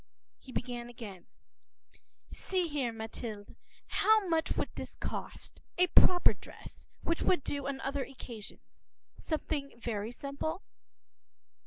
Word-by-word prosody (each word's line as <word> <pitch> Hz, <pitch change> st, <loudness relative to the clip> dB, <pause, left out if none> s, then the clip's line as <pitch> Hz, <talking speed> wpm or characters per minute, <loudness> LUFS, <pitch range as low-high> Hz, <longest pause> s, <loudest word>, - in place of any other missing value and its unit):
He 260 Hz, -, -11 dB
began 240 Hz, -1 st, -2 dB
again:— 210 Hz, -7 st, -8 dB, 1.0 s
“See 370 Hz, -2 st, 0 dB
here, 280 Hz, -6 st, 0 dB
Mathilde, 220 Hz, -2 st, -6 dB, 0.3 s
how 435 Hz, -2 st, +5 dB
much 325 Hz, -1 st, +2 dB
would -, -, 0 dB
this -, -, -6 dB
cost, -, -, -4 dB, 0.2 s
a 360 Hz, -, +7 dB
proper 355 Hz, 0 st, +7 dB
dress, -, -, -12 dB, 0.2 s
which 335 Hz, -, +1 dB
would 355 Hz, -7 st, +4 dB
do 285 Hz, -1 st, -1 dB
on 275 Hz, -1 st, -1 dB
other 275 Hz, 0 st, 0 dB
occasions; 235 Hz, -6 st, -10 dB, 0.3 s
something 290 Hz, -5 st, -2 dB
very 225 Hz, -2 st, -2 dB
simple? 280 Hz, +8 st, -3 dB
275 Hz, 120 wpm, -33 LUFS, 235-320 Hz, 1.0 s, a